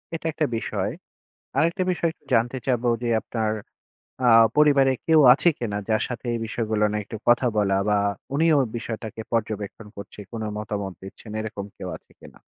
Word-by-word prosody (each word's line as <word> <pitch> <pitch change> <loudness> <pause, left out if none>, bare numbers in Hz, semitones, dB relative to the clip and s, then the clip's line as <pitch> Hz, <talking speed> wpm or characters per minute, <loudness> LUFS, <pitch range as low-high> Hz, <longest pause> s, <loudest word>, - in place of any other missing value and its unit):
এটা 165 - -7
একটা 155 - 0
বিষয়। - - -2 0.7
আরেকটা 170 +3 +2
বিষয় 170 -1 0
একটু - - -36
জানতে 120 +2 +2
চাবো 120 -1 +1
যে, 120 - 0
আপনার 110 -2 -2 0.8
আ - - +6 0.3
পরিবারে 140 -3 +5
কেউ 160 -1 +6
আছে 175 - +3
কিনা, 105 -4 -3
যার 110 -1 +2
সাথে 125 0 -6
এই - - -1
বিষয়গুলো 110 -2 -1
নিয়ে 105 0 -2
একটু 110 - -7
কথা 120 +1 +5
বলা 100 -2 +2
বা, 105 -1 +3 0.4
উনিও 160 0 +4 0.2
বিষয়টাকে 110 -1 -5
পর্যবেক্ষণ 110 -1 -3
করছে, 100 +1 -10
কোনো 110 -2 -4
মতামত 100 -3 -4
দিচ্ছেন। 95 +3 -11
এরকম 105 -2 -5
কেউ 95 - -6
আছে - - -22
কিনা? - - -15
115 Hz, 165 wpm, -24 LUFS, 105-130 Hz, 0.8 s, আ